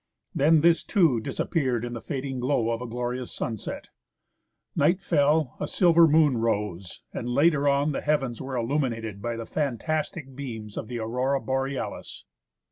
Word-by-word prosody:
Then 155 +2 +4
this 170 +1 +4
too 165 - +3
dis 110 - -6
appeared 130 -7 0
in 120 - -5
the 115 - -6
fading 135 -3 -4
glow 125 -3 +1
of 115 +1 -2
a 125 - -5
glorious 125 +1 -4
sunset; 110 -4 -5 0.9
night 170 +6 +3
fell, 150 -6 +2
a - - -2
silver 170 -2 +5
moon 150 -4 +4
rose, 105 -5 -2
and 120 - -4
later 145 +2 +3
on 140 +2 +2
the - - -3
heavens 135 -6 0
were 135 -1 -5
illuminated 115 -5 -2
by 120 +2 -2
the 115 0 -5
fantastic 150 +1 -2
beams 110 -6 -7
of - - -5
the 120 - -5
Aurora 125 +5 0
Borealis. 135 0 -4
130 Hz, 160 wpm, -26 LUFS, 115-150 Hz, 0.9 s, silver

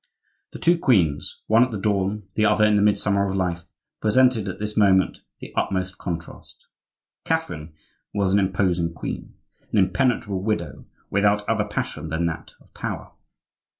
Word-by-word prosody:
The - - -8
two 170 0 +3
queens—one 105 - +2
at 125 - 0
the 110 - -4
dawn, 100 +1 0
the 110 - +1
other 105 0 +4
in 105 0 +4
the 100 - +3
midsummer 100 -1 +2
of 95 - -2
life—presented 105 +6 0
at 95 - -4
this 105 0 -4
moment 95 -3 +3 0.2
the - - -10
utmost 95 -1 -1
contrast. 85 -2 -7 0.6
Catherine 75 +1 -2 0.4
was 100 -2 0
an 100 - +5
imposing 90 -3 0
queen, - - -6 0.4
an - - 0
impenetrable 100 -2 +1
widow, 85 -9 -3 0.3
without 105 +1 +2
other 110 -2 +1
passion 105 -5 -4
than 80 +2 -1
that 80 -1 -4
of - - -25
power. - - -5
100 Hz, 150 wpm, -23 LUFS, 90-105 Hz, 0.6 s, an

